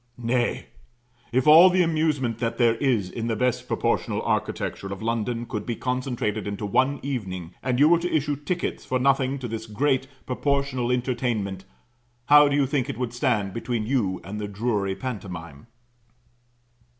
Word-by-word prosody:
Nay, 120 Hz, 0 st, 0 dB, 0.7 s
if 125 Hz, +1 st, +1 dB
all 165 Hz, +5 st, +9 dB
the 185 Hz, 0 st, +3 dB
amusement 155 Hz, -8 st, 0 dB
that 115 Hz, -1 st, -2 dB
there 120 Hz, -2 st, +4 dB
is 120 Hz, -8 st, +1 dB
in 115 Hz, +5 st, -4 dB
the 115 Hz, -, 0 dB
best 125 Hz, +2 st, 0 dB
proportioned -, -, 0 dB
architecture 95 Hz, -, -2 dB
of 100 Hz, -, -5 dB
London 115 Hz, +1 st, -1 dB
could 105 Hz, -3 st, -4 dB
be 120 Hz, -, -3 dB
concentrated 125 Hz, -5 st, -2 dB
into 100 Hz, +1 st, -4 dB
one 130 Hz, +7 st, +1 dB
evening, 95 Hz, -11 st, -4 dB
and 125 Hz, -1 st, 0 dB
you 145 Hz, -, +7 dB
were 170 Hz, +1 st, +5 dB
to 175 Hz, +1 st, -3 dB
issue 145 Hz, -1 st, +1 dB
tickets 160 Hz, +5 st, -3 dB
for 130 Hz, -, -1 dB
nothing 135 Hz, +1 st, +2 dB
to 130 Hz, -2 st, -5 dB
this 115 Hz, 0 st, -5 dB
great 135 Hz, +4 st, 0 dB, 0.2 s
proportional 130 Hz, -2 st, 0 dB
entertainment; 120 Hz, -6 st, -1 dB, 0.6 s
how 150 Hz, +2 st, +7 dB
do 140 Hz, -, +1 dB
you 145 Hz, -1 st, +3 dB
think 135 Hz, 0 st, -1 dB
it 140 Hz, -, -4 dB
would 120 Hz, -2 st, -3 dB
stand 115 Hz, -7 st, 0 dB
between 115 Hz, -2 st, -2 dB
you 105 Hz, -7 st, 0 dB
and 105 Hz, +4 st, -6 dB
the 105 Hz, -, -3 dB
Drury 100 Hz, -2 st, -1 dB
pantomine? 90 Hz, -, -7 dB
125 Hz, 165 wpm, -25 LUFS, 105-135 Hz, 0.7 s, all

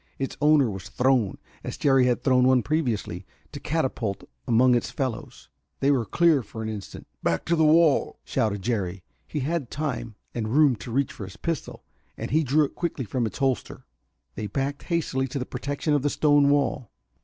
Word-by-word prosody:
Its 135 Hz, -, -3 dB
owner 150 Hz, -3 st, +5 dB
was 95 Hz, -4 st, -6 dB
thrown, 125 Hz, -5 st, +1 dB, 0.3 s
as -, -, -5 dB
Jerry 135 Hz, -3 st, +4 dB
had 125 Hz, 0 st, 0 dB
thrown 125 Hz, -1 st, +4 dB
one 130 Hz, -2 st, +4 dB
previously, 120 Hz, -, -1 dB, 0.3 s
to 145 Hz, -, -7 dB
catapult 130 Hz, -9 st, -2 dB, 0.2 s
among 125 Hz, +2 st, +5 dB
its 120 Hz, -, +1 dB
fellows. 130 Hz, -5 st, -5 dB, 0.3 s
They 140 Hz, +1 st, +3 dB
were 125 Hz, -5 st, +1 dB
clear 170 Hz, -5 st, +3 dB
for 110 Hz, 0 st, -8 dB
an 110 Hz, -, -3 dB
instant. 105 Hz, -3 st, -7 dB, 0.2 s
"Back 85 Hz, -, 0 dB
to 170 Hz, -, +2 dB
the 160 Hz, -, +3 dB
wall!" 155 Hz, -1 st, +4 dB
shouted 105 Hz, -3 st, -1 dB
Jerry. 100 Hz, -5 st, -2 dB, 0.2 s
He 150 Hz, -, -3 dB
had 150 Hz, -2 st, -2 dB
time 125 Hz, -7 st, -4 dB, 0.2 s
and 115 Hz, -2 st, -2 dB
room 140 Hz, +2 st, +4 dB
to 100 Hz, +4 st, -8 dB
reach 135 Hz, +2 st, 0 dB
for 100 Hz, -, -7 dB
his 95 Hz, -, -11 dB
pistol, 165 Hz, -3 st, -4 dB, 0.3 s
and -, -, -5 dB, 0.2 s
drew 150 Hz, +4 st, +4 dB
it -, -, -8 dB
quickly 165 Hz, -7 st, -3 dB
from 115 Hz, +3 st, -1 dB
its -, -, -8 dB
holster. 135 Hz, -2 st, -2 dB, 0.5 s
They 105 Hz, -, -4 dB
backed 135 Hz, +6 st, -3 dB
hastily 145 Hz, -6 st, 0 dB
to 130 Hz, -, -5 dB
the 125 Hz, -, -3 dB
protection 140 Hz, +4 st, -2 dB
of 145 Hz, -, +2 dB
the 145 Hz, -, +1 dB
stone 145 Hz, -1 st, +4 dB
wall. 140 Hz, -5 st, +1 dB
130 Hz, 190 wpm, -25 LUFS, 115-145 Hz, 0.5 s, owner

